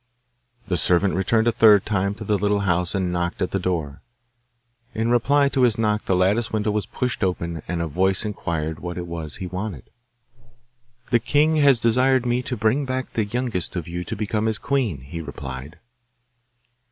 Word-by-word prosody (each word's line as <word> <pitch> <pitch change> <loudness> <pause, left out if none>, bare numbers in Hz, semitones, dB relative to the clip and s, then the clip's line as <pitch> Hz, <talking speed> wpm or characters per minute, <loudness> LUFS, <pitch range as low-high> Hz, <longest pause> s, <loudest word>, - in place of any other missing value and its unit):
The 90 -2 0
servant 90 +3 +3
returned 110 +5 +1
a - - +5
third 105 -3 +5
time 100 -1 0
to 110 - -8
the 105 0 +1
little 105 +1 +1
house 90 -2 0
and 95 -2 0
knocked 85 0 -2
at 90 - -1
the 95 - 0
door. 80 -6 -3 0.9
In 110 +1 0
reply 140 +4 +3
to 135 - 0
his 120 -2 +3
knock 105 -1 0
the 95 - +1
lattice 100 +6 +1
window 105 -1 0
was 105 0 -2
pushed 125 -5 -2
open, 85 -3 -2
and 85 0 -2
a - - -2
voice 95 +6 +1
inquired 80 -6 -3
what 90 +1 -6
it 90 - -4
was 85 -3 -5
he 95 - -6
wanted. 90 - -6 1.2
'The 120 - +5
king 150 +6 +2
has 140 -5 +5
desired 125 +2 +3
me 120 +1 +1
to 125 -1 -4
bring 110 +6 +1
back 130 -1 -3
the 110 - 0
youngest 115 -5 -2
of 85 -3 -4
you 90 +1 -4
to - - -4
become 105 +1 -1
his 110 -1 0
queen,' 120 - -1
he 75 +6 -7
replied. 65 +1 -8
100 Hz, 190 wpm, -23 LUFS, 90-115 Hz, 1.2 s, a